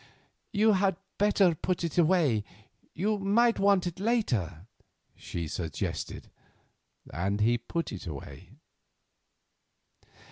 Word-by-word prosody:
"You 215 +2 +4
had 190 -2 +2 0.2
better 200 -3 +4
put 175 +3 -2
it 170 - -2
away; 160 - +3 0.5
you 210 +5 0
may 220 +5 +4
want 200 -4 +3
it 175 +1 -4
later," 120 - 0 0.5
she 85 -2 -5
suggested. 80 -1 -4 0.8
And 95 +7 -1
he 115 +3 +3
put 165 +8 -3
it 95 -3 -7
away. 75 -4 -9
170 Hz, 105 wpm, -29 LUFS, -, 0.8 s, You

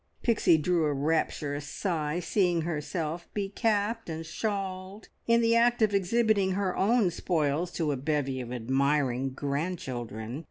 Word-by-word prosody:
Pixie 215 -8 +4
drew 165 +1 +1
a 150 - +1
rapturous 145 0 -1
sigh, 155 -1 -2
seeing 175 -1 +1
herself 165 +1 -3
be 200 -2 -1
capped 220 0 0
and 160 0 -5
shawled, 190 +2 -4 0.2
in 230 0 +4
the 230 0 +3
act 235 0 +4
of 210 -2 +2
exhibiting 200 0 +2
her 190 -1 -1
own 210 -2 +3
spoils 160 0 0
to 160 -3 0
a 140 - -1
bevy 135 -1 -1
of 120 -1 -7
admiring 135 +1 +1
grandchildren. 130 - -4
170 Hz, 145 wpm, -28 LUFS, 145-200 Hz, 0.2 s, Pixie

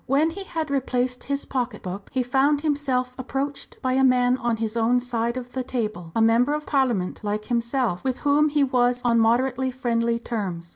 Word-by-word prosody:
When 295 +5 +3
he 390 +3 -7
had 320 -5 -3
replaced 250 -2 -1
his 280 0 -2
pocket 245 -5 -3
book, 190 +2 -6
he 260 - 0
found 275 +3 +2
himself 275 -4 0
approached 275 +2 -4
by 255 -1 +1
a 265 +1 +3
man 250 -1 +4
on 235 -3 -1
his 220 0 -3
own 235 +2 +3
side 235 -1 -2
of 245 -1 -6
the 260 0 -3
table, 215 -9 -4
a 225 - +2
member 240 +6 +3
of 300 0 -5
Parliament 240 -10 0
like 210 0 -2
himself, 235 -4 -1
with 260 -2 -2
whom 295 +1 +3
he 290 -1 +2
was 245 -2 +1
on 235 -1 +4
moderately 255 +3 +2
friendly 235 -2 0
terms. 195 -8 -4
250 Hz, 195 wpm, -24 LUFS, 230-270 Hz, -, man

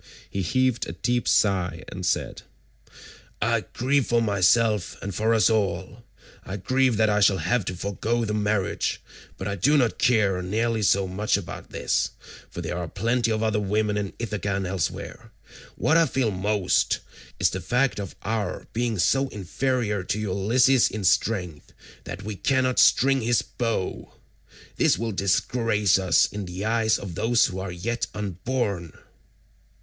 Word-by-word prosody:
He 100 - -2
heaved 130 +6 +1
a - - -5
deep 120 -1 -1
sigh 90 -4 +1
and 90 - -7
said, 90 - -1 1.0
"I 115 0 0
grieve 135 +2 +1
for 120 - +2
myself 105 -1 +2
and 100 +1 -5
for 110 +4 +1
us 115 -1 +4
all; 100 0 -1 0.4
I 95 - -5
grieve 130 +3 +1
that 110 - +3
I 105 - +2
shall 100 -1 +4
have 95 +6 0
to 90 - -3
forgo 110 +5 -2
the 105 - -2
marriage, 105 -2 -1 0.4
but - - -5
I 100 - -2
do 140 - +3
not 120 -5 +1
care 105 -6 +2
nearly 110 +4 -1
so 100 -1 +2
much 100 +3 0
about 100 - -8
this, - - 0 0.4
for - - -7
there 90 - -4
are 85 - -4
plenty 115 +6 0
of 110 0 0
other 110 -1 +1
women 105 +1 0
in 105 -2 -3
Ithaca 105 -3 -3
and 95 -1 -2
elsewhere; 90 -2 -4 0.4
what 160 - +2
I 165 -1 +4
feel 130 -4 0
most 100 0 +1 0.4
is - - +3
the 95 - -4
fact 125 +2 0
of 100 -3 -6
our 110 0 -3
being 115 -1 -1
so 135 +9 +2
inferior 105 +1 -2
to 105 - -2
Ulysses 110 +6 +3
in 105 -2 -5
strength 90 -4 0 0.3
that 85 +3 -7
we 105 0 -5
cannot 130 +3 +1
string 135 0 +4
his 120 +1 +1
bow. 115 -6 -3 0.7
This - - +3
will 115 +2 -2
disgrace 100 +1 +1
us 95 -3 +4
in 105 -1 -5
the 90 +3 -5
eyes 110 0 +2
of 95 -3 -7
those 115 +7 +3
who 95 - -4
are 95 -1 -4
yet 115 +7 -3
unborn." 100 - -3
105 Hz, 165 wpm, -25 LUFS, 95-115 Hz, 1.0 s, us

